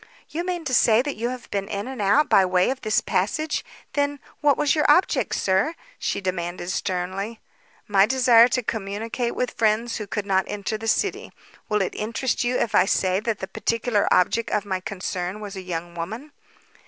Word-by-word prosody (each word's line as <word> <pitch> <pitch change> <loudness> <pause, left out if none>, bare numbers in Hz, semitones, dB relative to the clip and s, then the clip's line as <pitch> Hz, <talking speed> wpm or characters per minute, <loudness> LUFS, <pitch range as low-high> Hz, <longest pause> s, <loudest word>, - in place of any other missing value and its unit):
"You 335 +3 -3
mean 355 -2 -3
to 260 - -2
say 235 -1 +5
that 290 0 -3
you 235 +3 -2
have 250 -1 -7
been 200 -1 -2
in 200 +1 -4
and 260 -4 -5
out 240 +10 +4
by 195 - +5
way 180 +3 +2
of 265 - -5
this 215 -2 +1
passage? 295 +12 -1 0.3
Then, 285 0 0 0.2
what 290 -2 +3
was 295 - +2
your 300 -2 +2
object, 355 +6 +3
sir?" 195 - +1 0.2
she - - -1
demanded 175 -1 -3
sternly. 190 +4 -3 0.5
"My 200 0 +4
desire 240 -2 +6
to 250 0 -1
communicate 225 +3 -3
with 250 - -1
friends 225 +2 +1
who 210 - -6
could 210 0 -3
not 190 -1 +2
enter 205 +1 -3
the 225 +1 -5
city. 395 - 0 0.4
Will 210 -2 +2
it - - -3
interest 230 +5 -1
you 245 +1 +1
if 230 - -1
I 185 - +5
say 185 -1 +1
that 220 0 -2
the 190 - -3
particular 230 -1 0
object 220 +5 +2
of 210 -1 0
my 190 -2 -2
concern 185 0 -4
was 205 -1 -7
a 190 - -5
young 175 -1 -5
woman?" 220 - -6
215 Hz, 195 wpm, -24 LUFS, 190-250 Hz, 0.5 s, desire